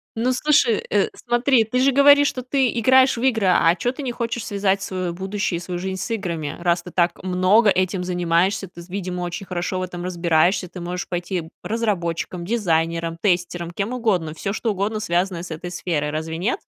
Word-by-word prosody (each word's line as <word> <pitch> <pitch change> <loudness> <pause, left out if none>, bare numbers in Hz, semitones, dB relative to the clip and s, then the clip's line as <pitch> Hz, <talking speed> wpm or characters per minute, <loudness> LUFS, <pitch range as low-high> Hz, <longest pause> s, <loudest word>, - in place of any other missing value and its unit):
Ну, 245 +3 +1
слушай, 255 -4 +3
э, 205 -1 +2
смотри, 240 0 +2
ты 220 +4 -1
же 270 +2 +4
говоришь, 285 +1 +6
что 255 - -3
ты 260 +1 +1
играешь 260 +3 +5
в 230 - -5
игры, 225 -6 +2
а 175 -2 +4
чё 245 +7 -1
ты 265 - -8
не 260 -3 -2
хочешь 235 -1 -3
связать 200 -1 0
своё 185 -3 -3
будущее 190 0 -2
и - - -6
свою 180 0 -5
жизнь 190 0 -4
с - - -4
играми, 170 -9 -3
раз 170 0 +1
ты 180 - -10
так 175 -1 +1
много 185 +4 +4
этим 185 -1 +1
занимаешься? 180 +2 +1
Ты, 175 -1 -12
з 170 - -15
видимо, 180 -1 -4
очень 175 +3 -4
хорошо 180 0 -3
в - - -2
этом 175 -1 -6
разбираешься. 175 +1 +1
Ты 180 +1 -9
можешь 180 +1 -4
пойти 175 -2 -3
разработчиком, 185 -6 -2
дизайнером, 165 -5 0
тестером, 175 -2 0
кем 200 +6 -3
угодно, 195 -11 0
всё 195 +5 -4
что 220 +2 -1
угодно, 205 +2 -2
связанное 180 -3 -1
с 180 - -8
этой 160 +3 -5
сферой. 160 -4 -2
Разве 160 +2 -4
нет? 210 - -1
185 Hz, 200 wpm, -22 LUFS, 175-220 Hz, -, говоришь